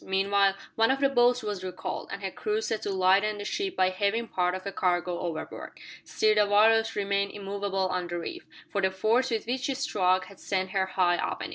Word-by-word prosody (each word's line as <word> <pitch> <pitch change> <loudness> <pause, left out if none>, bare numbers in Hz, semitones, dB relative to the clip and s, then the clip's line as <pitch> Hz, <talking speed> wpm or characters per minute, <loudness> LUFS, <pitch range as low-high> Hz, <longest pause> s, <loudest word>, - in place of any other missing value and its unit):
Meanwhile 195 0 +2 0.2
one 225 0 +3
of 270 +1 +2
the 275 0 +3
boats 245 -2 +3
was 205 -3 -4
recalled, 185 -1 -5
and 200 - -6
her 190 - -2
crew 210 +3 -2
set 220 0 -2
to - - -3
lighten 195 +2 +3
the 205 - -6
ship 390 - -2
by 185 0 +2
heaving 205 +5 0
part 180 0 0
of 185 - -6
the 200 - -4
cargo 180 -2 0
overboard. 165 -3 -6 0.2
Still 215 0 +2
the 210 -1 +3
Walrus 225 +2 +4
remained 200 0 0
immovable 200 -1 -2
on 180 -1 -2
the 175 0 -4
reef, 345 - -6 0.3
for 200 - 0
the 190 - +3
force 220 +7 +1
with 225 -3 -2
which 250 +2 -2
she 275 0 -1
struck 185 -9 +1
had 195 - -15
sent 190 -1 -2
her 190 -1 0
high 185 -2 +2
upon - - -3
it. - - -5
200 Hz, 225 wpm, -28 LUFS, 185-220 Hz, 0.3 s, Walrus